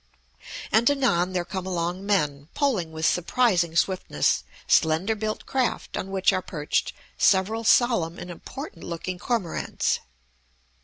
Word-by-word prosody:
And 230 +4 +5
anon 185 -11 +1
there 175 -1 -1
come 190 +1 -5
along 175 +1 -2
men, 150 -8 0
poling 220 - 0
with 160 0 -3
surprising 180 -2 +2
swiftness 165 - +1 0.2
slender 160 +7 +3
built 215 0 -4
craft 260 -2 -1
on 190 - -4
which 190 -1 +2
are 185 - 0
perched 150 -5 -2 0.3
several 205 +4 +3
solemn 225 -8 +3
and 180 - -7
important 175 - -9
looking 175 +2 -5
cormorants. 215 -8 -1
185 Hz, 125 wpm, -25 LUFS, 170-220 Hz, 0.3 s, And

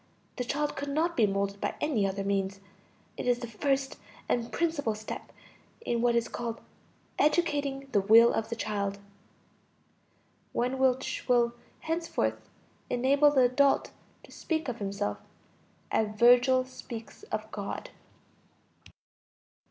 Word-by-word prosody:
The 250 - -1
child 290 +4 -1
could 285 +1 -4
not 325 +4 0
be 220 -3 +4
molded 200 0 -2
by - - -1
any 230 -10 +1
other 195 +1 -3
means. 195 -1 -1 0.6
It - - -4
is 245 -1 +3
the 240 - -6
first 270 +4 -1 0.3
and 235 -1 -1
principal 305 -9 0
step 215 0 -7 0.5
in 240 - -1
what 240 0 +3
is 235 -1 +1
called 230 -1 -4 0.6
"educating 285 -4 +1
the 205 - +3
will 225 +4 +7
of 225 - -2
the 230 - -3
child," 200 -3 -2 1.6
one 250 +2 -1
which 260 -1 0
will 240 -2 +3 0.3
henceforth 330 +1 -1 0.5
enable 275 +4 +4
the 280 -3 +3
adult 255 +3 +3 0.3
to - - -16
speak 320 -2 -2
of 240 -2 -4
himself 200 0 -2 0.7
as 210 -1 0
Virgil 245 +2 +5
speaks 235 -3 -9
of 215 0 -3
God. 200 -1 -5
240 Hz, 130 wpm, -29 LUFS, 215-275 Hz, 1.6 s, will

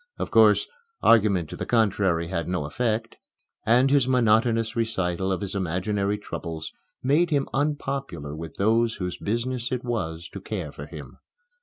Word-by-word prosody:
Of - - -4
course, 110 -2 +5 0.4
argument 100 -7 +4
to - - -5
the - - -5
contrary 95 -7 +2
had 85 -3 -2
no 90 -4 -1
effect; 110 +7 -2 0.5
and 125 +4 +4
his 140 -3 +4
monotonous 115 -2 +2
recital 95 -5 -1
of 95 - -1
his 100 -1 -3
imaginary 100 +2 -1
troubles 80 -5 -6 0.3
made 150 +6 +3
him 140 -3 +1
unpopular 135 - -2
with 80 0 -8
those 115 +3 +2
whose 90 -2 -4
business 120 +3 -2
it 125 -1 -2
was 85 -9 -3
to - - -8
care - - -4
for - - -9
him. - - -10
110 Hz, 155 wpm, -25 LUFS, 90-120 Hz, 0.5 s, course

